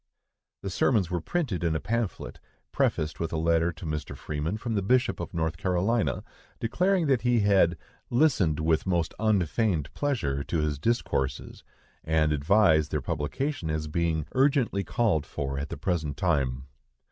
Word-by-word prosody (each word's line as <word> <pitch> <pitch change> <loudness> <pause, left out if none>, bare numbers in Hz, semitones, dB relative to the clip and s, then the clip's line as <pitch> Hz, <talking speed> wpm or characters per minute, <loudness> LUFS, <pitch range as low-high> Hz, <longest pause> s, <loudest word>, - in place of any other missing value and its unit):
The 100 - -3
sermons 95 -3 +2
were 90 -2 -1
printed 120 - -2
in 80 -2 +1
a - - 0
pamphlet, 115 0 -3 0.3
prefaced 75 -2 0
with 80 -1 -2
a 80 - -1
letter 85 +1 +2
to 80 +2 -10
Mr. 75 -1 -4
Freeman 75 +7 -3
from 115 +1 -4
the 100 - +1
Bishop 125 +6 +2
of - - -5
North 80 -3 -2
Carolina, 95 - 0 0.4
declaring 180 - +1
that 135 -5 +2
he 120 -2 +2
had 95 -4 +3 0.3
"listened 120 - +2
with 80 +2 +1
most 85 -3 0
unfeigned 100 -5 +1
pleasure" 75 - -1
to 85 - -1
his 75 -2 -1
discourses, 75 - -1 0.4
and 80 -1 +2
advised 80 0 +3
their 75 - -1
publication, 80 - -3
as 75 0 -2
being 80 -1 0
"urgently 130 -7 +2
called 100 -12 +1
for 70 -1 -3
at 70 +1 -4
the - - -5
present 80 -3 -2
time." 70 -7 0
85 Hz, 160 wpm, -27 LUFS, 75-110 Hz, 0.4 s, had